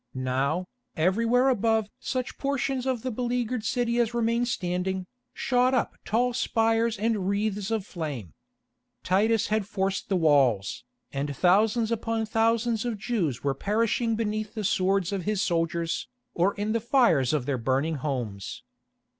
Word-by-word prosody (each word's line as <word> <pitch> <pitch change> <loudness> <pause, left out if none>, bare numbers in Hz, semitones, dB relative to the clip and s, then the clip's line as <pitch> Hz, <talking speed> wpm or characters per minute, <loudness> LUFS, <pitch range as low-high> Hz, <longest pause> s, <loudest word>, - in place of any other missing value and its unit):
Now, 135 +7 -1 0.3
everywhere 230 +9 +3
above 225 -3 +2
such 255 -2 -3
portions 270 -2 -1
of 255 -4 -1
the 255 - -2
beleaguered 245 0 -1
city 240 +1 0
as 235 0 +1
remained 235 +1 +1
standing, 185 -2 -2 0.3
shot 255 0 +2
up - - 0
tall 245 +3 +1
spires 225 -1 +1
and 210 -2 0
wreaths 205 -1 -1
of 220 -4 -1
flame. 145 - -5 0.7
Titus 210 +4 +2
had 215 -2 0
forced 195 -1 -2
the 195 - +2
walls, 140 - +2 0.3
and 140 0 -3
thousands 215 +5 +3
upon 225 0 -1
thousands 225 +1 +1
of 240 -3 -2
Jews 195 - -2
were 140 -1 +1
perishing 225 - 0
beneath 215 0 -2
the 215 - -3
swords 190 -1 +1
of 195 -3 -3
his 210 -1 0
soldiers, 165 -2 -1 0.3
or 185 +4 +1
in 205 +1 -2
the 230 0 0
fires 230 - +3
of 145 -5 0
their 135 -2 -1
burning 135 +6 0
homes. 125 -9 -4
210 Hz, 145 wpm, -27 LUFS, 170-230 Hz, 0.7 s, everywhere